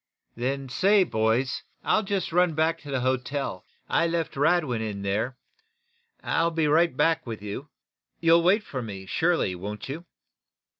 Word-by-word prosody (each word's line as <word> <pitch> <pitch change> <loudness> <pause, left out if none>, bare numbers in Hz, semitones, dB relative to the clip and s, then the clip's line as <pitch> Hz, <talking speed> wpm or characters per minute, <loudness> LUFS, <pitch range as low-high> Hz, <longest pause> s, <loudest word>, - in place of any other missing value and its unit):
"Then 135 +3 -2
say, 195 +10 +4
boys, 115 -2 0 0.2
I'll 215 - +3
just 195 -5 -2
run 180 -2 +3
back 160 +1 +1
to 145 - -11
the 135 -2 -1
hotel. 130 -4 -2 0.2
I 170 - +2
left 165 -1 -2
Radwin 145 -5 +2
in 105 -3 -4
there. 110 +6 -1 0.9
I'll 165 +1 +1
be 160 -2 0
right 165 +3 +3
back 165 -3 +2
with 110 -3 -6
you. 105 +8 -6 0.5
You'll 165 0 +5
wait 195 +5 +3
for 130 -9 -5
me, 100 -4 -7
surely, 160 - +1
won't 105 +7 -6
you?" 160 +5 -6
145 Hz, 155 wpm, -26 LUFS, 115-170 Hz, 0.9 s, You'll